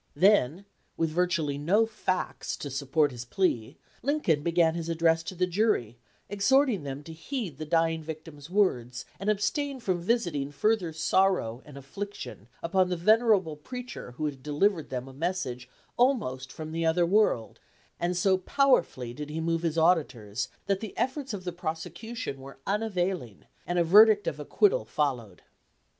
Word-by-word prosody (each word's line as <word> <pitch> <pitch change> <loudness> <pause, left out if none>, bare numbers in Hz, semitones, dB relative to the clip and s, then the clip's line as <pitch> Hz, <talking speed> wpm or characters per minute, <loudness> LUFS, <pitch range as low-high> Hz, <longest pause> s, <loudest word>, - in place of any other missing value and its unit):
Then, 190 -3 +3 0.3
with 165 -1 0
virtually 160 -4 0
no 195 +10 +3
facts 185 -4 -3
to 145 - -6
support 140 +2 +1
his 120 -1 -7
plea, 120 - -1 0.2
Lincoln 260 - +1
began 170 0 +3
his 170 0 -4
address 165 0 +2
to 185 - -7
the 180 +1 +2
jury, 175 - 0 0.3
exhorting 225 - +3
them 140 0 -6
to 160 - -9
heed 175 - -5
the 155 - -5
dying 165 0 +2
victim's 155 -1 -9
words 125 - 0
and 195 +2 -1
abstain 265 +7 0
from 185 -7 -1
visiting 175 - 0
further 195 +2 +1
sorrow 160 -7 +1
and 145 -2 -12
affliction 140 - -7 0.2
upon 185 +2 +2
the 180 - -1
venerable 210 -3 +3
preacher 250 - -8
who 155 +5 -3
had 140 -3 -4
delivered 155 +4 +1
them 125 0 -4
a 135 - -11
message 135 -6 -3 0.3
almost 210 - +1
from 155 0 -7
the 165 +1 -2
other 165 +2 +3
world; 185 - +2 0.4
and 175 +1 -1
so 190 +1 +3
powerfully 180 - +2
did 150 +3 -7
he 155 +2 -4
move 165 0 0
his 165 -1 -1
auditors 140 - +1 0.2
that 195 -1 0
the 215 -2 -8
efforts 265 +1 -1
of 200 -4 -5
the 180 - -3
prosecution 175 - -5
were 135 +1 -11
unavailing 185 - -2 0.2
and 175 - -1
a 175 - +4
verdict 205 +4 +7
of 150 - -3
acquittal 415 - +2
followed. 125 - -2
170 Hz, 160 wpm, -28 LUFS, 145-200 Hz, 0.4 s, verdict